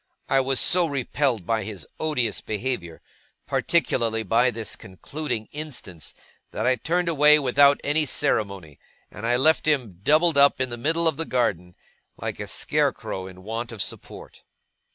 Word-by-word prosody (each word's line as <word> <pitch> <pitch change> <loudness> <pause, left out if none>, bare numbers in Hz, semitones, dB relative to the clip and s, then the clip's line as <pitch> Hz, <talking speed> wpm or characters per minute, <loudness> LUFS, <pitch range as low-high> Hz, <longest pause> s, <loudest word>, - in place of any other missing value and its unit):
I 135 - +3
was 135 0 0
so 175 -1 +3
repelled 135 - -1
by 110 +2 0
his 100 -6 -7
odious 125 -9 0
behaviour, 105 -7 -4 0.4
particularly 115 -9 0
by 115 +5 +3
this 115 -2 -5
concluding 110 +4 -6
instance, 130 - -6 0.3
that 110 - -3
I 130 0 +3
turned 175 +7 0
away 150 -2 +6
without 140 0 +4
any 150 +1 +1
ceremony; 95 - -1 0.3
and 105 +3 -5 0.2
left 160 0 +3
him 125 - 0
doubled 155 +4 +3
up 140 -1 +5
in 130 -1 -1
the - - -2
middle 165 +7 0
of 160 -4 0
the 165 - -3
garden, 90 - -1 0.4
like - - -5
a - - -5
scarecrow 95 0 -1
in 95 0 -13
want 115 +3 -4
of 115 - -9
support. - - -8
125 Hz, 155 wpm, -24 LUFS, 105-150 Hz, 0.4 s, away